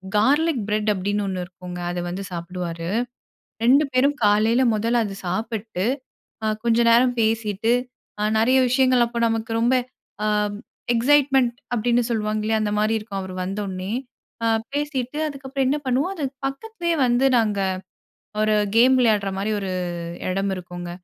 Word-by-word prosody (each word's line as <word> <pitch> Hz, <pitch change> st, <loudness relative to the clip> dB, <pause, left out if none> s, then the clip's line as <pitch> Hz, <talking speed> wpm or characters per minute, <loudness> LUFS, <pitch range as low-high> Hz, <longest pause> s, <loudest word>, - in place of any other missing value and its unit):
'Garlic 285 Hz, +7 st, +3 dB
bread' 210 Hz, 0 st, +1 dB
அப்படின்னு 205 Hz, +2 st, -1 dB
ஒன்னு 185 Hz, -2 st, -2 dB
இருக்குங்க. 180 Hz, 0 st, -9 dB
அதை 175 Hz, 0 st, -3 dB
வந்து 190 Hz, +3 st, -4 dB
சாப்பிடுவாரு. 170 Hz, -1 st, -5 dB, 0.7 s
2 265 Hz, +5 st, +6 dB
பேரும் 275 Hz, +3 st, +3 dB
காலையில 215 Hz, +4 st, +4 dB
முதல்ல 230 Hz, +3 st, +1 dB
அதை 195 Hz, -, -5 dB
சாப்பிட்டு. 215 Hz, 0 st, -3 dB, 0.6 s
அ -, -, +1 dB, 0.2 s
கொஞ்ச 235 Hz, 0 st, +3 dB
நேரம் 245 Hz, +1 st, +4 dB
பேசிட்டு 220 Hz, 0 st, 0 dB, 0.5 s
அ -, -, +1 dB, 0.2 s
நிறைய 255 Hz, +4 st, +4 dB
விஷயங்கள் 255 Hz, -1 st, +4 dB
அப்ப 235 Hz, 0 st, -6 dB
நமக்கு 225 Hz, 0 st, -2 dB
ரொம்ப 240 Hz, +3 st, +3 dB, 0.5 s
அ -, -, +1 dB, 0.7 s
எக்ஸைட்மென்ட் 265 Hz, 0 st, +3 dB, 0.2 s
அப்படின்னு 240 Hz, +1 st, +2 dB
சொல்லுவாங்க 215 Hz, -1 st, -1 dB
இல்லையா! 220 Hz, 0 st, +1 dB
அந்த 210 Hz, -1 st, -1 dB
மாதிரி 215 Hz, +1 st, +2 dB
இருக்கும். 205 Hz, -2 st, -6 dB
அவர் 190 Hz, -1 st, -7 dB
வந்தோனே 190 Hz, 0 st, -4 dB, 0.8 s
பேசிட்டு 290 Hz, -1 st, -2 dB
அதுக்கப்புறம் 275 Hz, -2 st, -3 dB
என்ன 285 Hz, -, +2 dB
பண்ணுவோம். 265 Hz, +8 st, +1 dB
அது 315 Hz, -, -5 dB, 0.2 s
பக்கத்துலயே 340 Hz, +4 st, -2 dB
வந்து 245 Hz, +2 st, +2 dB
நாங்க 210 Hz, -3 st, +1 dB, 0.8 s
ஒரு 215 Hz, 0 st, +3 dB, 0.2 s
கேம் 250 Hz, +3 st, +6 dB
விளையாடுற 215 Hz, -5 st, +3 dB
மாதிரி 200 Hz, +3 st, -1 dB
ஒரு 195 Hz, -2 st, -3 dB, 0.6 s
இடம் 195 Hz, +1 st, 0 dB
இருக்குங்க. 175 Hz, -1 st, -7 dB
225 Hz, 140 wpm, -23 LUFS, 200-255 Hz, 0.8 s, 2